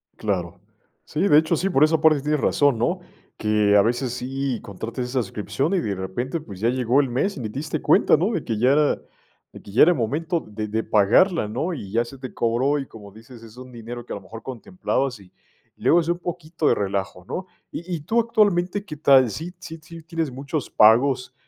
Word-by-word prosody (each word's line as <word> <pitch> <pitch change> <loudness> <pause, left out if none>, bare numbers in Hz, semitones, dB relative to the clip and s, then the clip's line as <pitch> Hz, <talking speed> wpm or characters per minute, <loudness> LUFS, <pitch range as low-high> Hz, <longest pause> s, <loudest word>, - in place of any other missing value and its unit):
Claro. 90 -5 -3 0.5
Sí, 150 - -3
de 150 - +6
hecho, 160 +2 +3
sí, 190 +4 -1
por 145 -6 +3
esa 155 +1 +3
parte 155 -3 +4
tienes 150 +1 0
razón 145 -4 +2
¿no? 175 +11 0 0.4
Que 105 -1 +2
a 100 - +7
veces 120 +3 -1
sí, 130 0 -3
contrates 115 +5 -6
esa 130 0 0
suscripción, 120 - -2
y 185 - +2
de 105 -10 -2
repente, 120 - -4
pues, 100 -10 -11
ya 115 - +1
llegó 125 +1 +2
el 135 - -2
mes 155 +10 -1
y - - -5
ni 110 -4 -4
diste 140 +7 -4
cuenta - - +4
¿no? - - 0
De - - -2
que 110 - -3
ya 125 +5 +3 0.8
de - - -11
que 100 - -13
ya 110 - +6
era 175 - +6
el 175 - 0
momento 155 +9 -1
de 105 0 -5
de 110 +2 -2
pagarla 110 - +3
¿no? 135 - -2
Y 100 -10 -7
ya 115 +2 +2
se 125 +3 -11
te 130 -1 -8
cobró 130 +5 +1
y, 135 - -6
como 105 -3 -13
dices, 115 +3 -14
es 115 +1 -14
un 130 0 -11
dinero 120 0 -8
que - - -6
a - - -3
lo 100 - -8
mejor 110 +4 -10
contemplabas, 130 - -3
y 95 -2 -18 0.5
y - - -14
luego 170 - +5
es 160 - -6
un 175 - +1
poquito 170 -2 -3
de - - +5
relajo 95 -2 -3
¿no? 185 - -5 0.3
Y 175 +1 -5
y - - -5
tú 225 +10 +1
actualmente, 205 -4 +1
¿qué 155 -7 -9
tal? 135 -4 +5
¿Sí 165 - -6
sí 165 -3 -9
sí 165 +1 -11
tienes 165 -3 -3
muchos 140 +3 -4
pagos, 125 +4 +4
130 Hz, 225 wpm, -23 LUFS, 110-160 Hz, 0.8 s, a